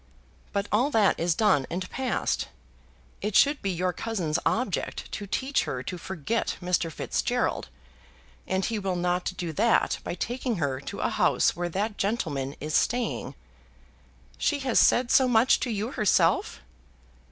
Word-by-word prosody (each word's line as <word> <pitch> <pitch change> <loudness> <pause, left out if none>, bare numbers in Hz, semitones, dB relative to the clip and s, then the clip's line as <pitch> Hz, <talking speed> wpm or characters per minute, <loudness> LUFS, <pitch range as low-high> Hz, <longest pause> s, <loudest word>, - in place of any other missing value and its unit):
But 200 0 -1
all 240 +7 +3
that 220 -8 +3
is 170 0 +1
done 190 -11 +3
and 180 +2 -3
past. 260 0 -1 0.7
It 210 0 -2
should 285 0 +5
be 195 - -1
your 180 0 -1
cousin's 180 -9 -2
object 225 -5 -2
to 205 - -5
teach 265 +7 0
her 125 -1 -4
to 180 - -5
forget 190 +6 -2
Mr. 180 -2 0
Fitzgerald, - - -1 0.8
and 190 0 0
he 225 -2 -1
will 190 -2 -2
not 180 +1 0
do 170 -2 -3
that 225 +7 +2
by - - -4
taking 245 +5 -2
her 140 -7 -1
to 140 - -6
a - - +1
house - - +2
where 175 +1 -2
that 205 +5 -2
gentleman 145 - -1
is 150 +1 -5
staying." 240 +4 0 1.0
"She 290 - +1
has 260 -3 +2
said 245 0 +4
so 260 - +5
much 245 +1 +4
to 255 - -2
you 220 +2 -2
herself?" 215 -7 +2
200 Hz, 155 wpm, -27 LUFS, 175-230 Hz, 1.0 s, should